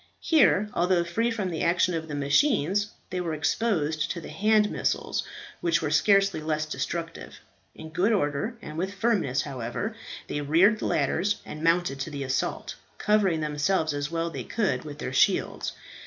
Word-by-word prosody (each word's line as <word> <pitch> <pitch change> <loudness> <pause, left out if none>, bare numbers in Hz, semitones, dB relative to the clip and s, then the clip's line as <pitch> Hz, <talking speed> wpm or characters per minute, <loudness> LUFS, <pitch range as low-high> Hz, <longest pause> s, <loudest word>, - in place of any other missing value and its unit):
Here, 280 - +4
although 175 0 +2
free 225 +8 0
from 210 -6 -2
the 160 - -3
action 175 +1 +2
of 160 -1 -3
the 150 - -5
machines, 195 - +2 0.2
they 180 0 -2
were 165 -3 -2
exposed 160 -3 0
to 175 - -3
the - - -9
hand 215 0 +3
missiles, - - -1 0.4
which 170 -1 +2
were 155 -2 -2
scarcely 195 +2 +3
less 155 0 -1
destructive. 165 +2 -5 0.4
In 160 0 -10
good 185 +8 +2
order, 200 - 0
and 155 - -6
with 190 +3 -3
firmness, 190 - +1
however, 135 - -4 0.3
they 145 - -3
reared 175 +9 +4
the - - -2
ladders, 170 +8 +1
and 155 +1 -8
mounted 165 -4 +2
to 135 - -3
the 140 -2 -5
assault, 135 0 -2 0.2
covering 200 -6 +2
themselves 155 +2 0
as 145 0 -2
well 165 0 -1
as 170 - -5
they - - -4
could 190 - -1
with 145 -1 -7
their - - -5
shields. - - +1
170 Hz, 175 wpm, -26 LUFS, 150-200 Hz, 0.4 s, Here